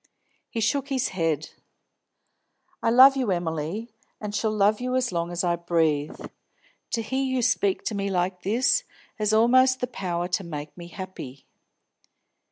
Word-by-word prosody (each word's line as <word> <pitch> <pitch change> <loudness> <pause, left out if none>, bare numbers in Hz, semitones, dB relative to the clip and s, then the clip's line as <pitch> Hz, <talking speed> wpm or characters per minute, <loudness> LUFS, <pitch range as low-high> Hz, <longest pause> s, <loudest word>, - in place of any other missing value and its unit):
He 225 - -3
shook 275 +6 +1
his 260 -2 0
head. 165 -5 -1 1.3
"I - - +2
love 260 +4 +8
you, 255 -5 -1
Emily, 175 +5 -2 0.3
and 210 -1 -5
shall 220 +1 0
love 210 +1 +2
you 255 0 -1
as 255 -3 +1
long 170 -1 -2
as 175 +1 -2
I 175 -1 +2
breathe. 160 -4 0 0.7
To 230 - +1
hear 265 +4 -1
you 260 -2 0
speak 200 -3 +1
to - - -2
me 200 -1 -2
like 180 -1 -1
this 250 - +2 0.4
has 210 0 +1
almost 255 +4 +5
the - - 0
power 180 -7 -3
to 185 +2 -1
make 150 -3 -7
me 170 -1 -9
happy. 175 -8 -9
200 Hz, 160 wpm, -25 LUFS, 170-245 Hz, 1.3 s, love